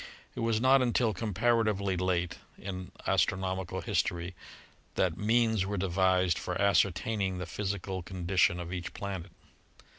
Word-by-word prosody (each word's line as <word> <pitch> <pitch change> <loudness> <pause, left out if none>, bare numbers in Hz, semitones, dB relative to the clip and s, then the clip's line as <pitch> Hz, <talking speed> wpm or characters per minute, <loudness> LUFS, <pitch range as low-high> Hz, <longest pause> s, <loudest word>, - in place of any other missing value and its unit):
It - - -7
was 115 -2 +1
not 130 +2 +5
until 120 -2 +2
comparatively 105 -1 +1
late 90 -1 -1 0.2
in 95 -1 -6
astronomical 95 -1 0
history 85 +1 -1 0.6
that 90 -3 +1
means 110 0 +2
were 100 +1 -3
devised 95 -1 +2
for 90 0 -3
ascertaining 100 0 +2
the 90 - -4
physical 95 +1 -3
con 90 0 -7
dition 90 -1 +3
of 90 +1 -5
each 90 -1 -5
planet. 95 -3 -5
95 Hz, 130 wpm, -30 LUFS, 90-105 Hz, 0.6 s, not